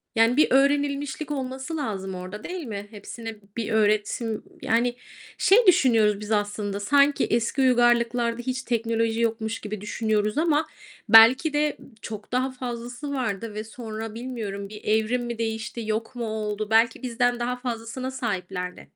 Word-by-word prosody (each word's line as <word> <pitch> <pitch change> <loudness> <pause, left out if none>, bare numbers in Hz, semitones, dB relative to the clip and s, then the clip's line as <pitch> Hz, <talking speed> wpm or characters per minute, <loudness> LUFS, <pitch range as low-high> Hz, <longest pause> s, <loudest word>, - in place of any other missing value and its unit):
Yani, 230 +4 +4
bir 305 - +6
öğrenilmişlik 280 +1 +1
olması 265 +3 -4
lazım 195 -9 -3
orada, 185 +4 -7
değil 355 -4 -5
mi? 205 -2 -6
Hepsine 225 +1 -8 0.2
bir 230 -1 -2
öğretim 215 +1 +1 0.2
yani, 240 +2 +1 0.4
şey 435 +3 +5
düşünüyoruz 225 - +4
biz 210 +1 -7
aslında, 205 -1 -1
sanki 280 +7 +3
eski 235 +4 0
uygarlıklarda 240 -1 +3
hiç 260 +1 -3
teknoloji 230 -1 0
yokmuş 225 -1 -1
gibi 210 -1 -6
düşünüyoruz 215 +2 -1
ama 315 -1 +2 0.4
belki 250 +7 +7
de 295 0 +1 0.2
çok 215 0 -8
daha 255 +1 0
fazlası 250 +2 -6
vardı 230 -4 -3
ve 215 +1 -4
sonra 220 -1 -7
bilmiyorum 220 -5 -5
bir 210 0 -10
evrim 220 +3 +1
mi 235 -1 -4
değişti, 225 +1 -3
yok 220 +3 -3
mu 235 - -3
oldu? 215 -1 -3
Belki 230 +1 +3
bizden 245 0 +1
daha 245 +1 -1
fazlasına 245 +1 -4
sahiplerdi. 190 -7 -4
230 Hz, 145 wpm, -25 LUFS, 215-255 Hz, 0.4 s, belki